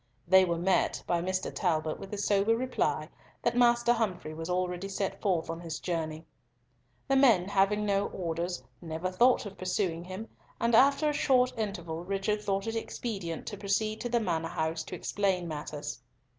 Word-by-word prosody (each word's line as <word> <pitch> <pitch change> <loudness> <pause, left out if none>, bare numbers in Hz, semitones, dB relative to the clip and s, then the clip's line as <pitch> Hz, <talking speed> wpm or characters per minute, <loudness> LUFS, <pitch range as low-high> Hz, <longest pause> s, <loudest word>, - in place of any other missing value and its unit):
They 190 +1 +7
were 170 -1 -1
met 180 +2 +1
by 170 -1 +1
Mr. 185 +1 -2
Talbot 155 -4 0
with 195 - -8
the 210 - -5
sober 205 +2 +2
reply 255 +1 0 0.4
that 235 - +1
Master 240 -1 +4
Humfrey 190 -9 -2
was 165 +2 -6
already 180 +1 -1
set 195 0 -3
forth 180 -5 +1
on 165 0 -4
his 165 -2 -5
journey. 160 -2 -3 0.8
The 270 - +3
men, 230 -10 +5
having 205 +1 +2
no 200 0 +1
orders, 170 -4 -3 0.2
never 165 +2 -3
thought 240 +5 +4
of 195 -2 -9
pursuing 180 -2 -1
him, 190 +5 -6 0.3
and 235 0 +1
after 275 +5 +5
a 300 - +2
short 255 -3 +3
interval 175 -7 -4
Richard 195 +3 -1
thought 195 -1 -1
it 225 0 -3
expedient 200 -7 -4
to 205 - -5
proceed 215 +2 0
to 240 - -2
the 235 0 +2
Manor 165 -6 -1
house 160 0 -2
to 180 - -6
explain 185 -1 0
matters. 150 -4 -5
190 Hz, 175 wpm, -30 LUFS, 170-215 Hz, 0.8 s, They